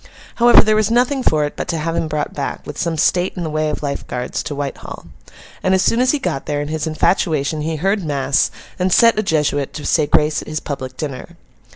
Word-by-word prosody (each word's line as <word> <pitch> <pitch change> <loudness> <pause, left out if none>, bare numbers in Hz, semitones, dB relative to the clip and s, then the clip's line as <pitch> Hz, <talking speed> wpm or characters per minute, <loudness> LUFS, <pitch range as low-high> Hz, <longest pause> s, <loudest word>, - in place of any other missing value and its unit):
However, 240 0 +7
there 215 0 +2
was 215 -1 +2
nothing 250 +4 +2
for 155 -10 +2
it 145 - -6
but - - -4
to 170 -2 -1
have 165 +1 -2
him 160 - -1
brought 150 -1 -3
back, 140 - -4
with 150 - -7
some 165 -2 -1
state 175 +4 +2
in 175 - -3
the 160 - -3
way 155 0 0
of 150 - -4
Life 140 -1 -3
Guards, 125 0 -3
to 145 - -5
Whitehall. 140 -1 -6 0.6
And 185 0 +2
as 190 - +2
soon 230 - +2
as 255 +1 +3
he 295 - +3
got 140 - -3
there, 145 -1 -1
in 145 0 -4
his 155 0 -2
infatuation, 155 -2 0
he 160 +1 -2
heard 195 +5 0
mass, 140 -2 +1 0.3
and 185 +1 +1
set 230 +2 +5
a - - +3
Jesuit 150 -7 0
to 150 - -6
say 155 -3 +2
grace 155 -1 +2
at - - -12
his 155 0 -3
public 130 -3 -6
dinner. 150 +3 -6
155 Hz, 240 wpm, -19 LUFS, 145-185 Hz, 0.6 s, However